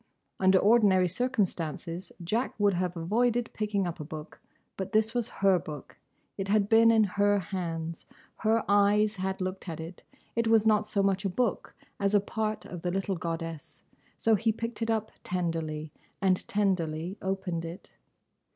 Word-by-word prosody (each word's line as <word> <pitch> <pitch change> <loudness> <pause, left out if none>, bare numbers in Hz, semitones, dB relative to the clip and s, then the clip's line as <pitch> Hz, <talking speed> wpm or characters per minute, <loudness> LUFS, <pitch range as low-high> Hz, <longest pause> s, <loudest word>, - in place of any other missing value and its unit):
Under 190 0 +5
ordinary 200 -3 +5
circumstances 180 - -2
Jack 225 +9 -1
would 205 -1 +4
have 180 0 -1
avoided 230 +7 +1
picking 210 -2 -1
up 175 0 -4
a - - -4
book; 155 0 -9 0.3
but 190 +3 -5
this 220 +1 +2
was 240 -2 -1
her 195 -2 +3
book; 150 -3 -9 0.4
it 195 - -2
had 205 0 +3
been 225 +1 +6
in 225 -1 +5
her 205 +1 +2
hands; 165 -3 -4 0.3
her 225 +1 +1
eyes 205 +1 +3
had 190 +1 -2
looked 185 0 -4
at 160 - -5
it; 165 +2 -8 0.3
it 230 0 +1
was 225 -1 +4
not 215 -1 +3
so 200 -2 +1
much 195 0 +1
a 195 - 0
book 230 +2 -1 0.2
as 200 +1 +2
a - - +7
part 215 +1 -3
of 175 -2 -7
the 180 - -1
little 195 +1 -1
goddess; 165 -3 -5 0.3
so 225 - +2
he 225 +2 +3
picked 230 +2 -5
it 225 - -1
up 220 -1 0
tenderly 165 -4 -2 0.3
and 185 -1 +1
tenderly 180 -4 0
opened 190 -3 -2
it. 170 +2 -8
195 Hz, 170 wpm, -29 LUFS, 170-215 Hz, 0.4 s, a